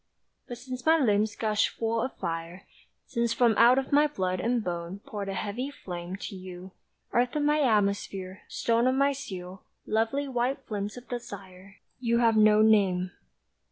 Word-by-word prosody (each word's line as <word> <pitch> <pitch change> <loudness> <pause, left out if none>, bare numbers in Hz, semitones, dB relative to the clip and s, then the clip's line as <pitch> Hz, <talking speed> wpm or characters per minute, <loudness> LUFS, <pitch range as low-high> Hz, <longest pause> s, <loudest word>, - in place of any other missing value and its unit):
But 245 - -6
since 255 0 -7
my 320 +1 +5
limbs 210 -6 +2
gushed 215 -2 +1
full 225 0 -1
of 255 - -3
fire, 165 +3 -5 0.4
Since 235 -2 0
from 240 -2 +4
out 240 +2 +6
of 270 0 -1
my 295 +1 +5
blood 185 -9 -2
and 235 +3 0
bone 175 0 -4
Poured 200 -2 -5
a 195 - -3
heavy 230 +8 -3
flame 180 -8 -7
To 200 - -7
you, 185 0 -9 0.4
earth 245 +2 +2
of 300 - +1
my 300 +1 +3
atmosphere, 200 -6 0
stone 235 +1 +1
Of 260 - +2
my 280 +1 +3
steel, 190 -9 -7 0.2
lovely 225 +6 0
white 255 +1 -1
flint 205 +1 -4
of 245 0 -11
desire, 195 -5 -8 0.2
You 235 -2 +1
have 230 -2 +4
no 215 0 +6
name. 190 -4 +3
220 Hz, 170 wpm, -28 LUFS, 190-250 Hz, 0.4 s, out